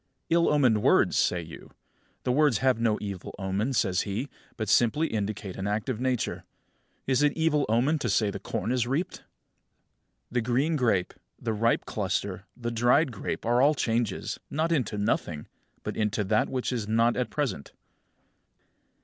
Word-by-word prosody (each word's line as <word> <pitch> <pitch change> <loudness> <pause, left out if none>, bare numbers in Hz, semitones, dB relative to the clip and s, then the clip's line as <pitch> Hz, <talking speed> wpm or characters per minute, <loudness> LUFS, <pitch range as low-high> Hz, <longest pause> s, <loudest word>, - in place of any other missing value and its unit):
"Ill 170 0 +4
omened 130 -8 +3
words!" - - +4
say 90 - +2
you. 80 - -11 0.5
"The 125 - +1
words 145 -3 +3
have 130 -1 +2
no 110 -2 +2
evil 100 -3 -6
omen," 100 +6 -1
says 95 -7 +2
he, 110 +7 -3 0.3
"but 110 -2 -3
simply 120 +9 +3
indicate 105 - -3
an 95 +1 -3
act 105 +5 -1
of 120 -4 -2
Nature. 125 -2 -1 0.6
Is 130 0 +2
it 145 0 +3
of - - -15
evil 160 -3 +2
omen 130 +8 +2
to - - -1
say 105 -3 +2
the 100 - -6
corn 110 - -3
is 125 -2 +1
reaped?" 150 +8 -1
35. - - -24 1.1
The 120 0 +1
green 130 +8 +1
grape, 115 -10 +1 0.3
the 115 -2 -2
ripe 115 +2 +1
cluster, 100 -1 -2
the 120 -1 -3
dried 125 +6 +3
grape 115 - -4
are 120 +2 +3
all 145 +3 +5
changes, 115 -5 -1
not 160 +3 0
into 130 -9 0
nothing, 85 -6 -1 0.4
but - - -4
into 105 0 0
that 105 +2 +1
which 130 0 -2
is 115 -4 -3
not 115 +2 +3
at 125 0 -1
present. 125 - -3
115 Hz, 175 wpm, -27 LUFS, 105-130 Hz, 1.1 s, all